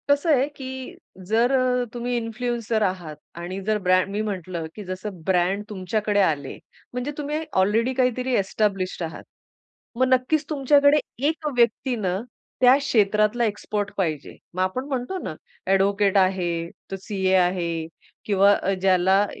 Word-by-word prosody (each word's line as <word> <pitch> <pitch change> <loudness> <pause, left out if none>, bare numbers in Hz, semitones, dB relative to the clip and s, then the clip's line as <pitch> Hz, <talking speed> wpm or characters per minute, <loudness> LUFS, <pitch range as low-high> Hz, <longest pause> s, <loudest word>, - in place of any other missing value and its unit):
कसं 285 +3 +3
आहे, 265 +1 +2
की 260 -2 -8 0.3
जर 230 +4 +3
अ, 255 -2 +2
तुम्ही 245 0 -2
इन्फ्लुएन्सर 230 -1 -2
आहात 180 -5 -2 0.2
आणि 180 +3 -5
जर 215 0 +2
ब्रँ 185 0 +5
मी 205 +1 -1
म्हटलं 185 -5 -4
की 210 - -7
जसं 185 0 -6
ब्रँड 190 +2 +1
तुमच्याकडे 205 +1 -1
आले. 145 -7 0 0.4
म्हणजे 250 +3 -3
तुम्ही 300 +1 -2 0.2
ऑलरेडी 225 +6 +2
काहीतरी 255 0 0
एस्टॅब्लिश्ड 195 -3 0
आहात. 160 0 -6 0.7
मग 260 +2 +2
नक्कीच 280 +4 +1
तुमच्याकडे 285 0 +4 0.3
एक 310 0 -2
व्यक्ती 240 +2 +2
ना, 190 -4 -1 0.4
त्या 250 +1 +8
क्षेत्रातला 215 -3 +2
एक्सपर्ट 205 -1 -3
पाहिजे. 160 -7 -2 0.2
मग 185 - -1
आपण 220 +8 -2
म्हणतो 265 +6 -3
ना, - - -4 0.3
ॲडव्होकेट 200 +1 +3
आहे, 185 -2 +2 0.4
तो - - -2
सीए 190 -2 -1
आहे 180 -1 +2 0.6
किंवा 200 0 +5 0.3
ज्याला 190 +1 +4
210 Hz, 140 wpm, -24 LUFS, 190-250 Hz, 0.7 s, त्या